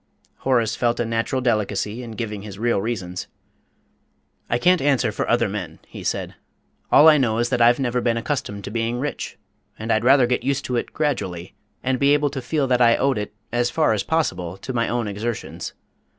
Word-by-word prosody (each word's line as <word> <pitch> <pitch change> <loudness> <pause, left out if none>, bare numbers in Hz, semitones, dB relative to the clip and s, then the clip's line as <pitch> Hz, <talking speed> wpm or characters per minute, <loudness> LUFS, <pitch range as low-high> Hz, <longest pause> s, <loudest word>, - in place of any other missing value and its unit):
Horace 115 -4 +1
felt 120 -1 0
a 120 - +1
natural 115 +3 -1
delicacy 105 -1 0
in 115 -2 -7
giving 105 -3 -4
his 100 -1 -9
real 115 -2 +1
reasons. 95 -5 -4 1.2
"I 120 - +2
can't 180 +7 +3
answer 135 -5 +2
for - - -3
other - - +3
men," - - -5
he - - -10
said. - - -2 0.6
"All 150 - +8
I 155 -2 +7
know 115 -4 +1
is 120 +1 +1
that 125 -2 0
I've 120 +1 +6
never 125 -2 0
been 115 -1 +1
accustomed 115 -5 -3
to 100 - -6
being 115 +1 -1
rich, 145 +4 -4 0.4
and 110 +1 -3
I'd 110 - +2
rather 130 +1 +6
get 125 +1 0
used 140 0 -1
to 125 - -2
it 120 - -2
gradually, 95 - -2 0.3
and 130 -1 0
be 140 +1 +5
able 145 -1 +1
to 135 -2 -4
feel 140 +3 0
that 125 -1 +2
I 115 -1 +6
owed 135 -4 +1
it, 105 - -4 0.2
as 120 +1 +1
far 155 -7 +2
as 105 - 0
possible, 95 - -1
to 130 +6 -6
my 115 -1 0
own 120 -2 -1
exertions. 105 +3 -4
120 Hz, 205 wpm, -22 LUFS, 110-130 Hz, 1.2 s, All